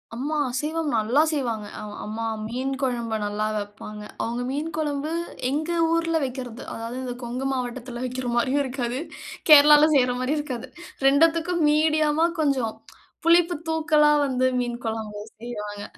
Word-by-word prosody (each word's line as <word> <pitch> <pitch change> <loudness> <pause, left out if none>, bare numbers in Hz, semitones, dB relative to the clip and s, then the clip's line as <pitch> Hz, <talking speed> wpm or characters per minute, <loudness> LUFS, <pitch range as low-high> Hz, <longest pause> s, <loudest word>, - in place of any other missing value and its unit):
அம்மா 290 +6 -2
அசைவம் 300 +5 -2
நல்லா 225 +6 +3
செய்வாங்க. 235 -8 -2
அ - - -7 0.2
அம்மா 220 +2 -4 0.2
மீன் 260 +4 -2
குழம்பு 235 -4 -1
நல்லா 205 +1 -1
வப்பாங்க. 210 +1 -7 0.2
அவுங்க 235 +2 -2
மீன் 295 +4 -2
கொழம்பு 295 -1 -2 0.4
எங்க 305 +4 -2 0.2
ஊர்ல 330 -1 +1
வைக்கறது. 250 -2 -6
அதாவது 230 +2 -5
இந்த 250 -1 -4
கொங்கு 245 +3 -4
மாவட்டத்தில 245 -1 -4
வைக்கிற 255 0 -3
மாரியும் 270 +4 +2
இருக்காது 250 -1 -3 0.5
கேரளால 300 +1 +9
செய்ற 250 -2 +3
மாரியும் 270 +4 0
இருக்காது. 255 -4 -6 0.4
ரெண்டுத்துக்கும் 330 +4 +3
மீடியமா 310 +1 +3
கொஞ்சம் 265 -7 +1 0.5
புளிப்பு 340 +1 +5
தூக்கலா 310 -2 +4
வந்து 255 -2 0 0.2
மீன் 240 -1 -3
கொழம்பு 220 -2 -4 0.2
செய்வாங்க. 210 -3 -6
260 Hz, 135 wpm, -24 LUFS, 235-300 Hz, 0.5 s, கேரளால